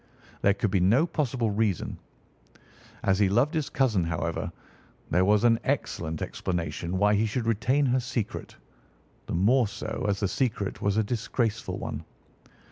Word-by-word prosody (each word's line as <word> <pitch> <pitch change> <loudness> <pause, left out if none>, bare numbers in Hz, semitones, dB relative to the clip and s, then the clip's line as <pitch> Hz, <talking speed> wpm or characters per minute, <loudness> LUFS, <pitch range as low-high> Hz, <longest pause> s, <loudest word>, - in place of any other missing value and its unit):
There 100 0 +4
could 100 0 -1
be 95 - +3
no 110 - +4
possible 130 -9 -1
reason. 100 -3 -1 1.0
As 95 0 +2
he 100 -2 +4
loved 120 - +2
his 155 -4 -1
cousin, 115 -9 +2
however, 80 -1 -2 0.6
there 90 +3 +4
was 105 +2 +4
an 115 -1 +5
excellent 80 - -2
explanation 90 0 -3
why 105 +2 +4
he 105 +2 +2
should 115 +2 -2
retain 115 +6 +2
her 130 0 +2
secret—the 110 - -7
more 115 +7 +4
so 100 - -4
as 100 -1 0
the 100 - +1
secret 110 -2 -1
was 100 +1 +1
a 110 - +3
disgraceful 115 0 -2
one. 75 - -5
105 Hz, 150 wpm, -27 LUFS, 95-125 Hz, 1.0 s, an